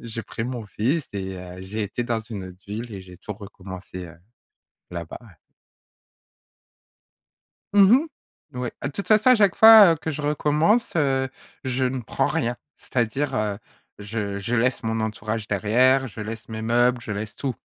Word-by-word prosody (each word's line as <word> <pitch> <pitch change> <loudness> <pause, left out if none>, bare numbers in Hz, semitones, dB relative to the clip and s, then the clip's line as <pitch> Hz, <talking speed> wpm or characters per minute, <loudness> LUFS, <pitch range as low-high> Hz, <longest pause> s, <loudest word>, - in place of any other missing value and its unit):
j'ai 115 0 -5
pris 115 - -6
mon 120 -3 -5
fils 130 +10 -1
et 95 -1 -4
heu, 90 0 -9
j'ai 105 +3 -4
été 105 +4 -3
dans 115 -2 -1
une 105 -4 -7
autre 90 0 -12
ville 110 +3 -6
et 95 - -7
j'ai 90 -1 -13
tout 105 - -6
recommencé, 95 -2 -9
heu, 85 0 -13 0.8
là-bas, 85 -2 -6
ouais. 105 -8 -17 2.4
Mmh 200 +1 +7
mh, 290 +6 +3 0.5
oui. 125 - -2
Ah, - - -3
de 140 - -4
toute 200 - -5
façon 215 +3 +5
à - - +8
chaque 205 -4 +3
fois, 220 -5 +10
heu, - - -9
que 160 +1 -4
je 150 - -5
recommence, 150 +9 +2
heu, 135 -3 +1 0.4
je 130 0 0
ne 130 0 -1
prends 115 - -1
rien. 135 -7 0 0.2
C'est-à-dire, 130 +3 -1
heu, 105 -3 -1 0.4
je 100 -1 -4
je 110 +5 -2
laisse 120 0 +1
mon 110 0 -1
entourage 110 0 -3
derrière, 125 +7 +3
je 110 -1 -9
laisse 110 +1 -6
mes 110 0 -5
meubles, 120 +2 +2
je 115 - -8
laisse 105 +1 -4
tout. 135 -3 -3
115 Hz, 180 wpm, -24 LUFS, 105-135 Hz, 2.4 s, fois